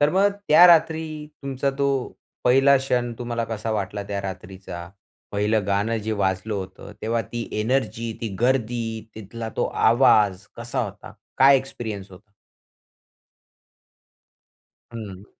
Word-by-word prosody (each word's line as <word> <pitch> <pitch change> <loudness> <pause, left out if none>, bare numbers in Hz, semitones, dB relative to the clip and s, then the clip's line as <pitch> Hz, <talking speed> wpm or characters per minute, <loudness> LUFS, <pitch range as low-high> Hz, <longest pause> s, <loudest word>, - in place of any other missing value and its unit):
तर 145 +1 +4
मग 195 +2 +4 0.2
त्या 165 +4 +9
रात्री 160 -1 +4 0.4
तुमचा 140 0 -1
तो 140 - +2 0.6
पहिला 135 +3 +6
क्षण 125 -2 -1
तुम्हाला 120 -1 -2
कसा 110 -1 -4
वाटला, 105 -1 -2
त्या 100 0 -4
रात्रीचा 95 -2 -7 0.4
पहिलं 105 0 +1
गाणं 100 +3 +1
जे 110 - -1
वाजलं 95 +3 -1
होतं, 95 +1 -7
तेव्हा 115 +1 0
ती 120 -1 -4
एनर्जी, 115 -1 -1
ती 115 - -2
गर्दी, 120 -1 +1 0.3
तिथला 110 +2 -7
तो - - +1 0.3
आवाज 105 -6 +4
कसा - - -3
होता, - - -9 0.3
काय 135 +1 +7
एक्सपिरियन्स 110 -7 -5
होता? 100 +3 -16 2.6
हं. 100 -4 -8
115 Hz, 125 wpm, -23 LUFS, 100-130 Hz, 2.6 s, त्या